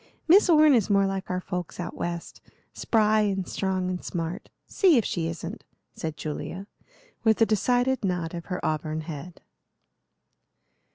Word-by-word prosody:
Miss 370 +3 +6
Orne 310 -3 +6
is 225 -5 +2
more 200 -1 +4
like 195 -1 -3
our 180 0 -1
folks 180 -2 -5
out 175 - -5
West, 170 -1 -5 0.3
spry 215 -1 +2
and 195 -3 -1
strong 190 -1 -1
and 180 -1 -3
smart, 170 +3 -4 0.2
see 360 -8 +4
if 230 - +2
she 165 -2 -1
isn't," 170 +6 -6 0.3
said 160 -2 -5
Julia, 170 +5 -5 0.6
with 220 -2 +3
a 225 - +6
decided 245 +4 +1
nod 180 -3 -1
of 170 -1 -6
her 180 -2 -4
auburn 155 0 -2
head. 160 +2 -8
185 Hz, 155 wpm, -26 LUFS, 170-220 Hz, 0.6 s, Miss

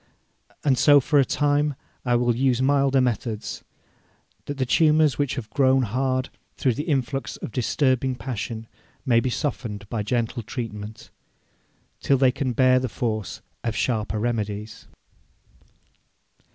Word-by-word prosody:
And 135 -4 +2
so 145 -1 +7
for 145 +2 +2
a - - +6
time 145 +1 +1 0.3
I 120 -1 +2
will 120 -1 +2
use 130 -1 +2
milder 135 0 +3
methods, 115 -3 -2 0.8
that 145 - -5
the 130 - 0
tumours 155 +1 +3
which 145 -3 0
have 125 -6 -5
grown 130 +2 +3
hard 130 +3 -1 0.3
through 130 - +2
the 145 +6 -4
influx 135 -1 -1
of - - -7
disturbing 130 +2 +1
passion 115 -3 -5 0.4
may 120 -4 +4
be 130 - -1
softened 115 -7 -3
by 115 - -2
gentle 120 +2 -1
treatment, 110 -2 -7 0.9
till 135 - +2
they 130 -1 +4
can 130 -1 -2
bear 130 +1 +4
the 130 -1 -3
force 110 -3 -3 0.2
of 115 -2 -2
sharper 110 -2 -1
remedies.' 105 -2 -3
125 Hz, 140 wpm, -24 LUFS, 115-135 Hz, 0.9 s, so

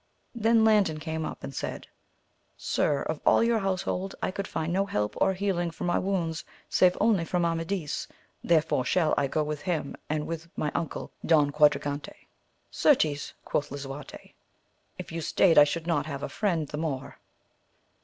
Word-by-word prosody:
Then 225 -1 +3
Landin 205 -8 +3
came 160 0 -3
up - - -7
and 135 - -6
said, - - -5 0.7
Sir, 145 -2 0
of 155 -1 -4
all - - +5
your 230 -1 +2
household 190 0 -2
I - - -1
could 195 +1 -4
find 160 +2 -2
no 195 +2 +1
help 105 - -1
or 190 - +4
healing 185 -3 0
for 165 - -8
my 175 - +1
wounds 175 -4 -1 0.2
save 180 -1 +3
only 210 -7 +3
from 175 +1 0
Amadis, 165 -1 -2 0.4
therefore 160 -5 +2
shall 160 +3 +2
I 140 - +1
go 155 +3 0
with 150 -1 -4
him 160 -4 -2
and 150 0 -1
with 165 0 -6
my 150 - -1
uncle 165 - -4
Don 150 -3 +4
Quadragante. 145 -1 +1 0.6
Certes, 155 - +2
quoth 145 0 -1
Lisuarte, 140 +1 -8 0.6
if - - -7
you 165 0 -4
staid 165 +1 +4
I 145 - +9
should 160 +3 -3
not 155 -3 0
have 140 -2 -5
a - - -3
friend 190 -6 -1
the 150 - -5
more. 145 -4 -4
165 Hz, 170 wpm, -28 LUFS, 150-185 Hz, 0.7 s, I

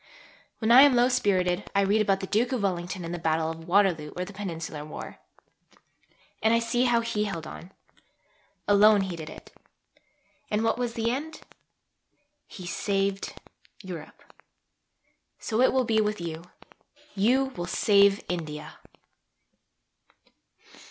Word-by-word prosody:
When 220 0 0
I 250 +3 +10
am 280 -2 +6
low 245 +1 +4
spirited 190 -6 0
I 200 - +4
read 205 +2 +2
about 195 -2 +1
the - - -3
Duke 225 +6 0
of 250 -5 -1
Wellington 180 -1 -2
in 165 - -5
the 175 - -4
Battle 160 0 0
of 165 0 -10
Waterloo 175 -5 +2
or 180 - -3
the 200 - -11
Peninsular 165 -6 -6
War. 150 - -9 1.2
And 220 +1 +3
I - - +4
see 235 +2 0
how 240 -1 +3
he 230 -2 -1
held 170 -6 -5
on. 180 - -10 1.0
Alone 205 0 +6
he 190 -2 -3
did 160 -2 -8
it. - - -13 1.0
And 210 +1 0
what 225 +1 0
was 240 -2 -2
the 230 0 0
end? 310 +5 -5 1.1
He 185 - -10
saved 195 +2 -2 0.5
Europe. 175 -5 -9 1.1
So 220 +2 -1
it 260 - +5
will 260 -1 +1
be 220 -1 +2
with 210 -1 -1
you. 165 0 -6 0.7
You 260 +7 +2
will 175 0 -4
save 200 +1 +3
India. 155 -4 -6
200 Hz, 145 wpm, -27 LUFS, 175-230 Hz, 1.2 s, I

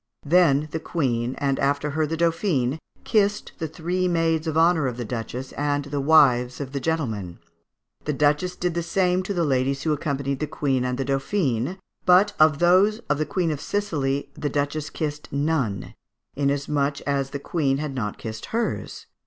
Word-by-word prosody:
Then 155 -2 +4
the 160 - -2
Queen, 125 -7 -1
and 135 -1 0
after 145 +1 0
her 155 +1 0
the 165 +2 -3
Dauphine, 165 -5 +1 0.2
kissed 210 -2 +1
the 160 - -2
three 175 +3 -1
maids 165 -2 +1
of 160 0 -1
honour 165 -3 +4
of 125 -2 -4
the 120 - -4
Duchess 125 +3 -5
and 145 0 -1
the 145 0 -2
wives 130 -5 +4
of 135 -2 -5
the 140 - -2
gentlemen. 115 - -2 0.7
The 150 - 0
Duchess 150 +6 +1
did 180 -1 -1
the 170 - -1
same 180 +1 +1
to 185 - -5
the 170 - +1
ladies 135 -1 0
who 155 - +2
accompanied 140 -2 -2
the 155 - -2
Queen 135 -4 0
and 125 0 -1
the 135 - -2
Dauphine, 135 - 0 0.3
"but 190 +3 +5
of 155 -1 +5
those 185 +6 +4
of 145 - +1
the 155 - 0
Queen 175 -2 0
of 145 -2 -4
Sicily 145 -9 -1
the 145 - -3
Duchess 145 +1 -2
kissed 150 -1 -4
none, 140 -8 -1 0.4
inasmuch 140 0 0
as 140 -1 -1
the 140 - -4
Queen 140 -2 0
had 150 -1 -3
not 105 -6 -3
kissed 110 -1 -7
hers. 230 +1 -3
145 Hz, 180 wpm, -24 LUFS, 135-165 Hz, 0.7 s, but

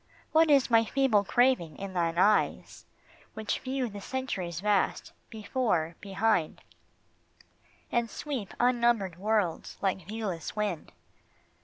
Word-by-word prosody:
What 320 0 +4
is 275 -4 +4
my 230 0 +6
feeble 235 -3 +2
craving 240 - +2
in 195 -1 -6
thine 170 -2 0
eyes 205 +3 +1 0.5
Which 220 -1 -2
view 260 -1 -2
the 205 -2 -8
centuries 195 -10 -4
vast, 205 0 0 0.2
before, 210 -7 -1
behind, 195 -4 0 1.3
And 235 -1 0
sweep 260 -5 -5
unnumbered 235 -7 +2
worlds 205 -4 -1
like 190 -3 -2
viewless 205 -7 -4
wind 205 -7 -3
210 Hz, 115 wpm, -29 LUFS, 185-240 Hz, 1.3 s, my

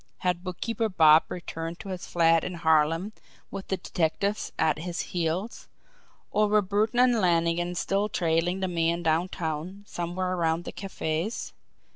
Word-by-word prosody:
Had 180 -1 +1
Bookkeeper 220 +5 -2
Bob 160 -4 +6
returned 165 -1 -5
to 200 - -9
his 185 -2 -5
flat 165 -1 +3
in 180 - -4
Harlem 165 +4 +2 0.4
with 195 - -6
the 190 - -1
detectives 190 +6 -1
at 155 -1 +2
his 170 +1 -3
heels 175 +5 -2 0.6
or 210 0 +3
were 210 0 +3
Burton 210 +5 0
and 245 -3 +4
Lannigan 175 0 +1
still 200 +4 0
trailing 175 +1 0
the 190 - 0
man 170 -1 0
downtown 165 +2 -1
somewhere 180 0 -3
around 165 -1 0
the - - -6
cafe's? 190 +1 -3
175 Hz, 145 wpm, -27 LUFS, 165-195 Hz, 0.6 s, Bob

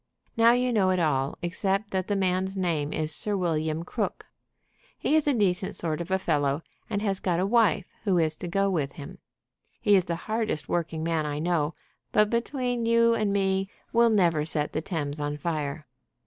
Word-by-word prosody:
"Now 230 +1 +6
you 250 0 +1
know 195 -4 +3
it 185 - +2
all 140 -4 0
except 195 +4 -1
that 190 -1 -1
the 205 - 0
man's 190 0 0
name 165 -6 0
is 155 0 -2
Sir 205 +5 -1
William 160 -2 -1
Crook. - - -3 0.7
He 305 - +1
is 310 -2 +2
a 290 - +4
decent 190 -3 +1
sort 160 -1 -2
of 170 - -6
a 190 - +2
fellow, 145 -4 0 0.3
and 205 -1 -2
has 195 -3 0
got 175 -2 0
a 185 - +2
wife 210 -6 +3 0.2
who 195 -4 +2
is 160 -2 +1
to 180 - -6
go 195 +3 +1
with 155 -8 -1
him. 145 -5 -10 0.6
He 205 -1 +4
is 185 -3 +3
the 170 - -2
hardest 215 - -2
working 165 -2 -2
man 160 -2 0
I 145 0 -3
know, 160 -1 0 0.4
but, 210 0 +3
between 245 0 -1
you 230 0 +4
and 215 -3 +1
me, 195 -1 +1 0.2
will 235 0 +5
never 170 -8 +3
set 150 -1 -1
the 155 - -1
Thames 150 -4 -3
on 145 0 -2
fire. 150 -1 -3
180 Hz, 195 wpm, -27 LUFS, 155-205 Hz, 0.7 s, Now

